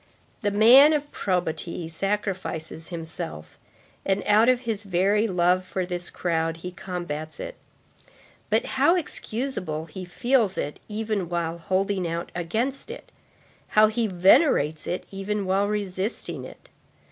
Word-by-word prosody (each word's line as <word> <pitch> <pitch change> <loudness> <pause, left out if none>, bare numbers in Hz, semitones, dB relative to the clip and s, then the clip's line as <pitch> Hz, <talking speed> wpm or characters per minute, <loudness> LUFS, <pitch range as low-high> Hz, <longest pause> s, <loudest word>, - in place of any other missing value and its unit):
The 205 - +1
man 245 +9 +8
of 295 -1 -2
probity 175 -2 -2
sacrifices 185 -3 -3
himself, 160 - -7 0.4
and 195 +1 0
out 215 +3 +5
of 250 -1 +3
his 225 -4 -2
very 200 +3 +2
love 180 -1 +2
for 185 0 -3
this 175 -1 -4
crowd, 165 -2 -1
he 180 - -4
combats 175 -5 -6
it. - - -5 1.0
But - - +2 0.2
how 340 - +6
excusable 225 - -2
he 185 +4 -8
feels 220 +3 +1
it 145 - -3
even 210 -4 -2
while 170 -1 -2
holding 190 +1 0
out 170 +1 -4
against 225 +11 -2
it! - - -9 0.7
How 215 0 +8
he 225 +1 0
venerates 180 - +4
it 180 - -3
even 200 +1 -3
while 195 +2 +2
resisting 205 0 -3
it! - - -13
190 Hz, 135 wpm, -25 LUFS, 170-215 Hz, 1.0 s, man